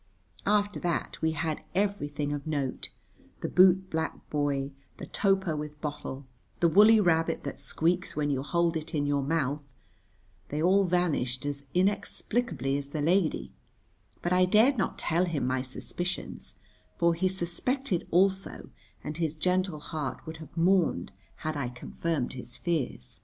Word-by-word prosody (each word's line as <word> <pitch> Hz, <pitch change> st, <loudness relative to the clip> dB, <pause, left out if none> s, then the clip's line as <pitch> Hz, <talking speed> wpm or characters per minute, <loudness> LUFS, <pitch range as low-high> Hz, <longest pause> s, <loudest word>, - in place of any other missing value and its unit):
After 205 Hz, 0 st, +2 dB
that 175 Hz, -3 st, -2 dB
we 160 Hz, 0 st, +2 dB
had 160 Hz, -1 st, -2 dB
everything 150 Hz, -8 st, 0 dB
of 145 Hz, +1 st, -5 dB
note, 140 Hz, -4 st, -2 dB, 0.5 s
the -, -, -1 dB
bootblack 185 Hz, -3 st, +3 dB
boy, 145 Hz, -2 st, 0 dB, 0.3 s
the -, -, -6 dB
toper 190 Hz, -5 st, +1 dB
with 150 Hz, 0 st, -6 dB
bottle, 145 Hz, -2 st, -5 dB, 0.3 s
the 170 Hz, -, +5 dB
woolly 215 Hz, +6 st, +7 dB
rabbit 165 Hz, -4 st, +2 dB
that 140 Hz, -, -5 dB
squeaks 170 Hz, +6 st, 0 dB
when 145 Hz, -1 st, 0 dB
you 135 Hz, -2 st, 0 dB
hold 170 Hz, +3 st, +1 dB
it 160 Hz, 0 st, -4 dB
in 145 Hz, -1 st, +1 dB
your 145 Hz, 0 st, +1 dB
mouth; 145 Hz, 0 st, 0 dB, 0.9 s
they 150 Hz, -, -2 dB
all 190 Hz, +4 st, +4 dB
vanished 155 Hz, -8 st, 0 dB
as 140 Hz, -1 st, -4 dB
inexplicably 200 Hz, -, 0 dB
as 140 Hz, -1 st, -5 dB
the 150 Hz, +1 st, -3 dB
lady, 175 Hz, +1 st, +1 dB, 0.7 s
but 175 Hz, -, +1 dB
I 185 Hz, 0 st, +5 dB
dared 220 Hz, +9 st, +5 dB
not 210 Hz, -, -1 dB
tell 175 Hz, +2 st, +1 dB
him 170 Hz, -5 st, -1 dB
my 130 Hz, 0 st, +1 dB
suspicions, 175 Hz, +7 st, -5 dB, 0.4 s
for 170 Hz, 0 st, +4 dB
he 180 Hz, +3 st, +1 dB
suspected 190 Hz, +5 st, -1 dB
also 190 Hz, +2 st, +1 dB, 0.3 s
and 150 Hz, +1 st, -5 dB
his 160 Hz, -2 st, -1 dB
gentle 180 Hz, 0 st, 0 dB
heart 150 Hz, -2 st, -5 dB
would 160 Hz, 0 st, -6 dB
have 160 Hz, 0 st, -12 dB
mourned 170 Hz, -, +3 dB, 0.3 s
had 155 Hz, 0 st, -1 dB
I 140 Hz, -4 st, -2 dB
confirmed 130 Hz, +3 st, -3 dB
his 125 Hz, -1 st, -7 dB
fears. 130 Hz, -, -3 dB
160 Hz, 150 wpm, -29 LUFS, 145-185 Hz, 0.9 s, woolly